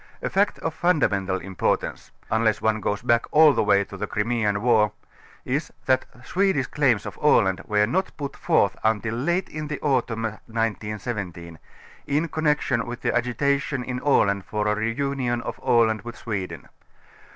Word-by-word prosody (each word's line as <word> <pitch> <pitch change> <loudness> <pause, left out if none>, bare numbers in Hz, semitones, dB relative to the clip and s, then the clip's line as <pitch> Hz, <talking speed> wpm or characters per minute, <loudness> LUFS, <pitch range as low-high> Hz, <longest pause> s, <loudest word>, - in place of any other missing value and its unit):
A - - -2
fact 200 +2 +2
of 160 - -1
fundamental 105 - +1
importance 95 0 -2 0.2
ŌĆö - - +2
unless 110 -1 +2
one 110 0 +1
goes 105 -1 -2
back 120 0 +2
all 155 -1 +6
the - - +1
way 100 -1 +3
to 100 - -11
the 100 - -4
Crimean 105 -1 0
\\'ar 100 - -6 0.3
ŌĆö - - -25 0.5
is, 145 +5 -2
that 130 - +2 0.2
Swedish 190 -8 +1
claims 130 -8 +1
of - - -7
Aland 95 -10 +3
were 105 0 +3
not 185 - -1
put 140 -2 -5
forth - - +2
until 110 0 +1
late 175 +10 0
in 155 -1 -6
the 150 -1 -4
autumn 125 -5 0
1917, 105 -6 -4 0.5
in 150 +4 +1
connection 150 -7 0
with 120 +1 -6
the - - 0
agitation 140 +3 0
in 125 0 -4
Aland 100 -8 +2
for 105 -1 -2
a 105 - +2
r├® 110 +2 -2
union 135 -4 -1
of - - -6
Aland 110 -2 +3
with 120 +2 -9
Sweden. 100 -5 -5
115 Hz, 170 wpm, -24 LUFS, 105-140 Hz, 0.5 s, all